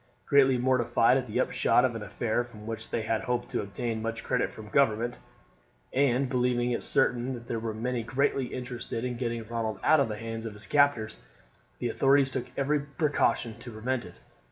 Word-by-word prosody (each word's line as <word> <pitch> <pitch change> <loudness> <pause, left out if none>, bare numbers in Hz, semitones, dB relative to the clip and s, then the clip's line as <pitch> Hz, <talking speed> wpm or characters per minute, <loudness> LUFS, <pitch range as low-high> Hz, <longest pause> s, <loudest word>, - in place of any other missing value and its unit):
Greatly 135 -2 +5
mortified 125 -1 +3
at 130 -1 -2
the 105 - -2
upshot - - +3
of - - 0
an - - -5
affair 120 +1 -1
from 110 -3 -12
which 110 0 -5
they 115 - -1
had 110 0 0
hoped 120 0 -2
to - - 0
obtain 110 +3 -3
much 115 0 -3
credit - - 0
from 110 -1 -10
government, 120 -2 +2 0.7
and 135 0 +2
believing 125 -1 +1
it 120 - -1
certain 125 +2 +1
that 120 -1 -10
there 115 -1 -3
were 110 0 -3
many 120 +3 -2
greatly 135 +3 0
interested 125 -2 -4
in 125 -1 -2
getting 115 -2 -3
Ronald 110 -2 -3
out 155 -1 +5
of 140 - +3
the 105 -1 -4
hands 115 0 -5
of 110 - -7
his 105 +1 -10
captors, 140 -7 +2 0.6
the 120 - -2
authorities 135 +2 +3
took 130 - -3
every 145 +2 +2
precaution 140 -5 0
to 120 - -9
prevent 120 +3 -2
it. - - -13
120 Hz, 195 wpm, -28 LUFS, 115-130 Hz, 0.7 s, Greatly